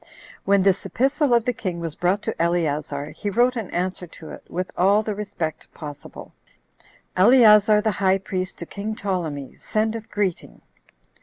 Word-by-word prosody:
6. - - -25 0.3
When 200 -1 +4
this 195 0 +2
epistle 270 +2 +1
of 235 -2 +4
the 250 - +1
king 185 -6 -4
was 165 -2 -4
brought 185 +6 0
to - - -2
Eleazar, 150 -4 -1
he 205 - -4
wrote 240 +5 +2
an 225 -6 -4
answer 180 0 -3
to 160 -1 -12
it - - -10
with 185 +1 -4
all 200 +4 +3
the 215 - -2
respect 195 -6 -5
possible: 145 -2 -10 0.8
"Eleazar 210 0 +6
the 220 - +1
high 190 -1 +2
priest 185 -1 -4
to 170 - -7
king 210 +4 -5
Ptolemy, 165 -10 -3
sendeth 220 +1 -2
greeting. 200 -5 -3
195 Hz, 165 wpm, -23 LUFS, 175-215 Hz, 0.8 s, Eleazar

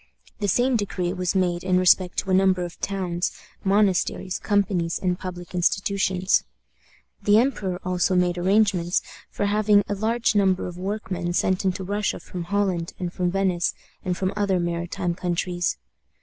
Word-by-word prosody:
The 205 - -1
same 245 +5 +2
decree 185 -4 -2
was 185 0 -2
made 175 -2 +1
in 185 -1 +2
respect 180 0 +3
to 190 - -1
a - - +3
number 185 -1 +3
of 175 - -10
towns, 185 -3 -1 0.3
monasteries, 190 -2 +1
companies, 195 -5 0
and 180 -1 -1
public 180 -1 -7
institutions. 190 +1 +1 0.8
The 205 +1 +4
emperor 210 -7 0
also 185 0 +1
made 180 -1 +2
arrangements 190 -2 +2 0.3
for 205 - -2
having 205 0 +3
a - - -1
large 225 +4 +1
number 190 -3 +2
of 180 - -6
workmen 185 -3 -3
sent 185 +1 +1
into 190 0 0
Russia 205 +2 -1
from 175 -2 -7
Holland, 190 -3 -1
and 180 -1 -4
from 180 -1 0
Venice, 185 -2 0 0.3
and 180 -1 -2
from 190 +1 -1
other 200 -3 +1
maritime 175 +1 -2
countries. 175 - -1
185 Hz, 155 wpm, -24 LUFS, 180-200 Hz, 0.8 s, The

